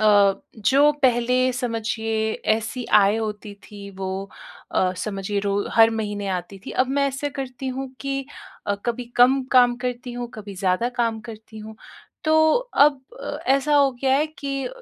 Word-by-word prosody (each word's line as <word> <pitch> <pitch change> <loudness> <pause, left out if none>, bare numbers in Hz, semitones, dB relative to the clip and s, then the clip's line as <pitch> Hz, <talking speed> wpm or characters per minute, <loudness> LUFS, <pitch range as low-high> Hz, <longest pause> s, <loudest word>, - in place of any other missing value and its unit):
अ, 205 -2 +5 0.2
जो 275 +7 +4
पहले 250 +1 +3
समझिए 225 -2 -2 0.2
ऐसी 225 +3 -4 0.2
आय 200 +2 +3
होती 210 -2 -5
थी 200 -1 -10
वो 190 -1 -4 0.7
अ, 185 -1 +2
समझिए 200 +1 -3
रो 200 0 0 0.2
हर 225 0 +7
महीने 210 -2 -3
आती 180 +2 -8
थी, - - -5
अब 255 - +1
मैं 280 +1 +1
ऐसा 280 +2 -3
करती 265 -1 -5
हूँ 265 +1 -4
कि 275 -1 -3 0.4
अ, 205 - +1
कभी 240 +1 -2
कम 260 +2 +5
काम 245 -1 +5
करती 245 0 -4
हूँ, 240 0 -5
कभी 205 -2 -8
ज़्यादा 190 +5 0
काम 225 -2 0
करती 220 0 -12
हूँ। 215 0 -10 0.5
तो 315 - +2 0.5
अब 285 -3 +2 0.5
ऐसा 275 +2 +3
हो 280 -1 +5
गया 265 0 +3
है 300 +2 +1
कि 275 -1 -3
230 Hz, 160 wpm, -23 LUFS, 210-265 Hz, 0.7 s, हर